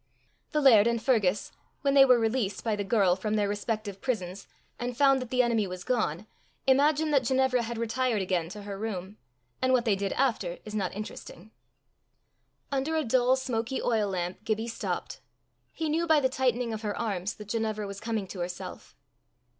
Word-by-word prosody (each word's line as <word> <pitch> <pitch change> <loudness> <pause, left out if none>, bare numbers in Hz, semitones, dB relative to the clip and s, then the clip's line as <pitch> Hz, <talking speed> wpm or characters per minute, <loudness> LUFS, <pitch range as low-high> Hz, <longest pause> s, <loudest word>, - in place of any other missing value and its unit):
The 300 -2 +1
laird 230 -6 +7
and 235 0 +1
Fergus, 215 -5 +1 0.3
when 275 -1 +2
they 275 -1 +8
were 250 -2 +6
released 225 -3 -1
by 220 -2 0
the 205 - -2
girl 195 -3 +3
from 210 +3 -2
their 205 -1 +1
respective 205 -1 -3
prisons 200 -7 -3 0.3
and 245 0 -4
found 275 -1 +4
that 255 - -6
the 250 0 +3
enemy 225 -4 +1
was 180 0 -7
gone, 215 -7 -1 0.4
imagined 295 +3 +3
that 270 -2 +4
Ginevra 260 -1 +2
had 235 0 -4
retired 230 0 0
again 180 -3 -1
to 210 +2 -8
her 200 -1 -6
room; 205 -2 -5 0.4
and 260 0 +3
what 250 -1 +3
they 215 -3 +3
did 195 0 -2
after 220 -10 0
is 215 - -8
not 195 -4 -2
interesting. 210 -1 -8 1.2
Under 280 +4 0
a 315 - +1
dull 250 +2 +3
smoky 255 -1 -2
oil 220 -4 +1
lamp 180 +1 -3
Gibbie 220 +1 -1
stopped. 230 - -4 0.5
He 320 - -3
knew 330 +3 0
by 315 -2 +5
the 260 -2 +2
tightening 250 -3 0
of 215 - -5
her 210 -2 -3
arms 205 -3 -2
that 210 -1 -11
Ginevra 215 -1 -1
was 200 0 -7
coming 220 -2 -2
to 190 - -7
herself. 175 0 -6
225 Hz, 185 wpm, -28 LUFS, 200-255 Hz, 1.2 s, they